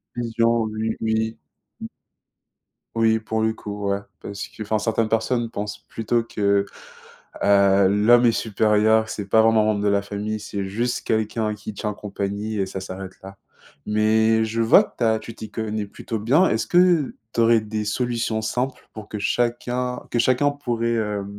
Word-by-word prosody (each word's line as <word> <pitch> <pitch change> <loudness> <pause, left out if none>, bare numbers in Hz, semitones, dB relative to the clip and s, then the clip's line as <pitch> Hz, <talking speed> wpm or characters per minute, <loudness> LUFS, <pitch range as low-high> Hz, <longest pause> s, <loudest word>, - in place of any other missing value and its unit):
Vision, 115 -1 +1
oui, 110 +1 -2
oui. 110 0 -1 0.4
Mmh. - - -5 1.1
Oui, 110 0 +3
pour 110 0 -2
le 110 0 +2
coup 105 -2 -5
ouais, 100 0 0 0.2
parce 100 0 -6
qu'enfin, 110 0 -3
certaines 110 0 0
personnes 115 +1 0
pensent 105 -1 -5
plutôt 115 +1 0
que, 100 -3 +1 0.8
heu, 100 -1 +4
l'homme 110 +5 +5
est 115 - +4
supérieur, 110 0 +2
c'est 105 -2 -5
pas 110 - +5
vraiment 110 0 +4
un - - +1
membre 105 -1 +1
de - - +2
la 100 0 +2
famille. 105 +2 -4
C'est 100 -1 -4
juste 120 +5 -2
quelqu'un 110 0 0
qui 105 +1 -8
tient 105 +1 -3
compagnie 100 +1 -4
et 95 - +1
ça 95 0 -6
s'arrête 95 0 -7
là, 95 0 -10 0.5
mais 110 +1 +3
je 115 +1 -1
vois 115 - +6
que - - -15
tu - - -2
as 110 0 +3
tu 115 - -9
t'y 110 - -9
connais 110 -1 -3
plutôt 110 +2 -6
bien. 140 - +3
Est-ce - - -1
que 175 -5 +3 0.2
tu - - -2
aurais 115 -1 +5
des 110 0 -4
solutions 115 0 -1
simples 125 +4 -3
pour 110 -2 -9
que 105 - -6
chacun 120 +3 -1
que 120 - 0
chacun 130 +4 +3
pourrait, 115 -5 -2
heu, 105 -2 -2
110 Hz, 175 wpm, -23 LUFS, 105-115 Hz, 1.1 s, vois